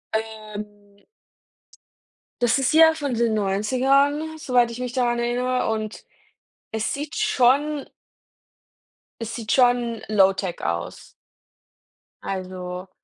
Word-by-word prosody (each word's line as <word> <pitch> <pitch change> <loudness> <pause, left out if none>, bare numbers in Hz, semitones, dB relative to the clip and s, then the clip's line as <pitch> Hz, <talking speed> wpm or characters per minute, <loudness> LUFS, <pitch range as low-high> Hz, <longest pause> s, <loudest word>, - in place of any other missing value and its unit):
Ähm 215 -1 -4 1.8
Das 240 +1 +3
ist 270 +2 +1
ja 320 0 +7
von 290 -4 -3
den 235 -1 +1
90ern, 270 +10 +1
soweit 245 -5 +2
ich 235 - -8
mich 250 -1 -4
daran 240 -2 +1
erinnere, 250 +1 0
und 215 -1 -4 0.7
es 220 0 -2
sieht 295 +4 -5
schon 295 - +2 1.3
Es 230 0 -5
sieht 225 -2 -4
schon 245 -2 +2
Low-tech 195 -3 +2
aus. 85 0 -4 1.1
Also 185 -1 -5
240 Hz, 100 wpm, -23 LUFS, 215-270 Hz, 1.8 s, ja